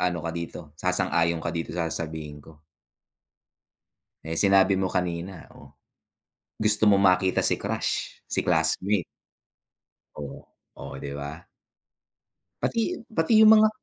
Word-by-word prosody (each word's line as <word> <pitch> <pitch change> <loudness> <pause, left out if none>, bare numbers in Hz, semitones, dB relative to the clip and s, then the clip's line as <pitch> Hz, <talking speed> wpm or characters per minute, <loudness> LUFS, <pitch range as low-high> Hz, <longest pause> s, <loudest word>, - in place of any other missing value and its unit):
ano 90 -1 0
ka 85 - -2
dito, 85 -2 -7
sasang-ayon 85 -2 +1
ka 85 - -2
dito 85 -1 -4
sa 85 -2 -1
sasabihin 80 -2 -5
ko. 80 -2 -17 1.6
Eh, 80 +1 -5
sinabi 95 +1 +4
mo 95 -1 -1
kanina, 90 0 -3
oh, 70 -1 -15 0.9
gusto 105 0 +4
mong 100 - +4
makita 95 -1 +3
si - - +2
crush, - - -3
si - - -1
classmate. 90 +3 +1 1.1
Oh, 75 -2 -8 0.3
o - - -8
'di 70 -1 -6
ba? 75 +5 -8 1.2
Pati, 235 +10 -1 0.2
pati 165 +7 +4
yung 220 0 +8
mga 215 0 +6
90 Hz, 125 wpm, -25 LUFS, 80-95 Hz, 1.6 s, yung